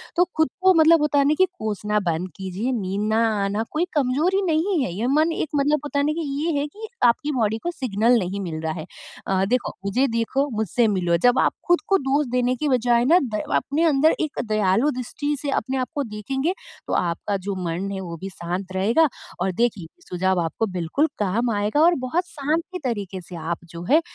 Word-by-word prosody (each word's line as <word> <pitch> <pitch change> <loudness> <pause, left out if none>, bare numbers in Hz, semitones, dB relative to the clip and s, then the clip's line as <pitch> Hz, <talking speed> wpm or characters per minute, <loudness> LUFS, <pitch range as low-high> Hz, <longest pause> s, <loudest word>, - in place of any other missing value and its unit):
तो 355 0 +4
ख़ुद 315 -3 +3
को 375 0 +6
मतलब 325 -1 +6
होता 295 -1 +2
है 280 - +3
ना 300 - +4
कि 375 - +4
कोसना 210 0 -1
बंद 170 +3 -3
कीजिए 195 +6 -3
नींद 195 +3 -2
ना 225 +1 +3 0.2
आना 205 +3 -1
कोई 315 +3 0
कमज़ोरी 290 +4 +2
नहीं 340 +2 +1
है 185 - -3
ये 215 +7 -2
मन 305 +5 +3
एक 315 - -2
मतलब 290 +2 +2
होता 290 -1 -2
है 285 - +2
न 305 - +1
की 335 - -3 0.2
ये 335 - +1
है 285 - 0
कि 430 +9 -9 0.2
आपकी 245 +5 +2
बॉडी 220 -5 0
को 345 - -1
सिग्नल 240 - +2
नहीं 190 +1 -3
मिल 165 -4 -4
रहा 160 0 -2
है 155 -2 -6 0.4
अ, 190 0 +2
देखो 245 +4 0
मुझे 250 +8 +2
देखो 230 +4 0
मुझसे 220 +2 +1
मिलो 180 -4 +1
जब 245 0 +5
आप - - +3 0.2
ख़ुद 350 - +4
को 390 - +4
दोष 280 +1 +1
देने 250 0 +1
की 300 +4 -2
बजाय 240 -2 +3
ना 335 +7 +6
द 210 - 0
अपने 280 - 0
अंदर 310 0 +4
एक 310 -1 -3
दयालु 215 +4 +2
दृष्टि 290 +4 -3
से 290 - -3
अपने 265 -1 -1
आप 255 -1 -1
को 290 - 0
देखेंगे 265 - -2 0.3
तो - - -2
आपका 180 +4 -1
जो 200 - -1
मन 175 +4 -2
है 195 - -4
वो 170 -2 -6
भी 195 - -5
शांत 180 +2 -5
रहेगा 230 +12 +3 0.3
और 190 +1 +1
देखिए 215 -8 0 0.2
सुझाव 185 +1 +1
आपको 165 +7 -1
बिल्कुल 180 - +1
काम 220 +4 0
आएगा 210 +8 +1
और 345 +2 +5
बहुत 350 +7 0
शांत 305 +3 -1 0.2
तरीके 205 -7 -3
से 175 +1 -11
आप 165 +1 -3 0.2
जो 170 - -6
है 315 +3 +6
240 Hz, 215 wpm, -23 LUFS, 195-295 Hz, 0.4 s, को